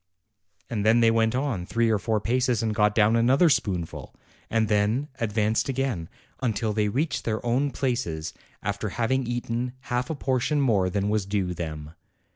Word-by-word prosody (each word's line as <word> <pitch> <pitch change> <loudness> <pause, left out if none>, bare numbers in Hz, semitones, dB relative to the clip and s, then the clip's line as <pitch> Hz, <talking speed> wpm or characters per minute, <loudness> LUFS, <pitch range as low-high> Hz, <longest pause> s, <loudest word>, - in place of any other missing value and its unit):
and 105 -3 -2
then 110 +2 +5
they 115 -1 +5
went 115 +1 +2
on 130 -9 -1
three 115 +4 +1
or 105 - +2
four 110 0 0
paces 120 +1 +1
and 110 -1 0
got 105 -1 +2
down 110 +1 +4
another 130 +9 +4
spoonful, 90 - -2 0.3
and 115 -1 +1
then 110 +7 +1
ad 115 -3 -1
vanced 110 +3 +1
again, 130 -11 -2 0.3
until 110 -3 0
they 105 -1 +1
reached 145 +9 -1
their 110 0 -2
own 130 +5 +1
places, 115 - -2 0.3
after 100 +1 -2
having 120 +5 0
eaten 120 0 -2 0.2
half 125 +1 0
a 160 - -2
portion 135 +2 0
more 105 -9 +2
than 100 +2 -1
was 105 -2 0
due 100 -3 -1
them. 75 -3 -6
115 Hz, 175 wpm, -26 LUFS, 105-125 Hz, 0.3 s, then